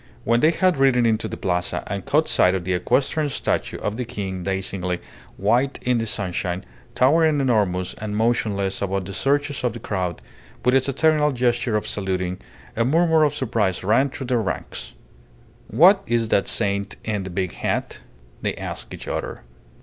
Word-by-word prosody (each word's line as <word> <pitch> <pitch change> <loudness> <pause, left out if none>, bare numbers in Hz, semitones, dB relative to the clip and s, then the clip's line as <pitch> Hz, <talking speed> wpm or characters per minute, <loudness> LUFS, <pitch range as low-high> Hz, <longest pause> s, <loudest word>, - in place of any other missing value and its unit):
When 115 +1 +3
they 155 - +5
had 180 0 +2
ridden 130 -3 +4
into 110 -1 +1
the - - -6
Plaza 90 -1 -1
and - - -4
caught - - +3
sight 90 +1 +3
of 95 - -2
the 95 +1 -1
equestrian 140 - +1
statue 135 - -2
of 105 +2 -3
the 125 - -1
King 100 -6 -5
dazzlingly 95 -1 -2 0.4
white 125 +7 +1
in 125 -1 +2
the 115 - -2
sunshine, 95 -4 -2 0.3
towering 155 +3 +4
enormous 100 -9 +1
and 105 -1 -5
motionless 105 -4 0
above 95 -1 -1
the 100 - -7
surges 145 +3 0
of 125 -3 0
the 120 - -7
crowd, 90 -6 -3 0.5
with 125 - +4
its 135 +1 +3
eternal 150 +1 +3
gesture 120 -3 +1
of 105 - -4
saluting, 95 -2 -2 0.4
a 115 - +2
murmur 160 +4 +3
of 145 -1 +1
surprise 110 -9 0
ran 115 +8 +3
through 135 - -6
their 120 -2 +1
ranks. 100 - -5 0.7
"What 190 +5 +6
is 115 -2 +1
that 100 - +2
saint 100 -1 -1
in 105 -2 -2
the 95 - -6
big 95 0 -2
hat?" - - -3 0.4
they - - -1
asked - - -5
each - - -10
other. - - -4
115 Hz, 175 wpm, -23 LUFS, 95-135 Hz, 0.7 s, What